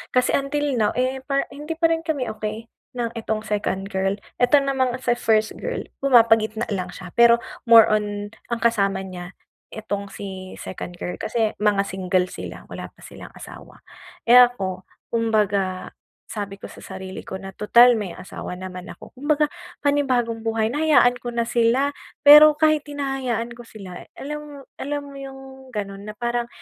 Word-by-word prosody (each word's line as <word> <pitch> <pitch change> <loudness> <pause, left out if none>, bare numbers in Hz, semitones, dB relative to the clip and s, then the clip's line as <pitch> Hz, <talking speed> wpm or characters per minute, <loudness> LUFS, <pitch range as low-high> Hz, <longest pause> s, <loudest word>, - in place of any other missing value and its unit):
kasi 250 - +3
until 290 +1 -1
now 210 - +2
eh, 260 +1 -1
par 275 0 -1
hindi 295 +4 -6
pa 330 - +5
rin 325 0 0
kami 295 -6 -2
okey 215 +1 -5 0.3
ng 235 -1 -2
itong 220 -1 -3
second 200 -2 -2
girl, 195 +1 0 0.2
eto 245 +4 +6
namang 265 -3 0
sa 240 - +3
first 220 -2 +1
girl, - - -3 0.2
pumapagitna 225 -4 +4
lang 185 -2 -3
siya 180 -1 -10
pero 235 0 +7 0.3
more 230 -2 +10
on 205 -1 -2 0.2
ang 235 -1 -2
kasama 200 -4 +1
niya 180 -1 -9 0.4
itong 205 -2 -5
si 190 -2 -8
second 175 -1 -7
girl, 180 - -4
kasi 220 -1 0
mga 205 -2 +3
single 185 -1 0
sila, - - -8
wala - - -7
pa - - -41
silang - - -11
asawa. - - -12 0.5
Eh, 235 - +5
ako 195 -7 +2 0.3
kumbaga 205 -5 0 0.4
sabi 200 -2 -5
ko - - -9
sa - - -13
sarili 190 0 -7
ko 190 - -6
na, 195 0 -9
tutal 240 +3 +6
may 205 -5 -3
asawa 185 0 -7
naman 185 -1 -8
ako, - - -13
kumbaga 295 +3 +1 0.4
panibagong 255 -6 +1
buhay 225 -1 0
na, 295 - -1
hayaan 285 -6 +5
ko 240 - -3
na 235 -1 -1
sila. 240 +5 +2 0.3
Pero 300 +1 +10
kahit 310 -1 +3
hinahayaan 265 -5 -2
ko 240 - -11
sila, 195 -6 -10 0.2
alam 295 -1 -7 0.2
alam 290 +1 -2
mo 280 - -12
yung 270 0 -8 0.3
ganon 200 -3 -5
na 210 - -8
parang 240 0 -1
230 Hz, 165 wpm, -23 LUFS, 200-270 Hz, 0.5 s, more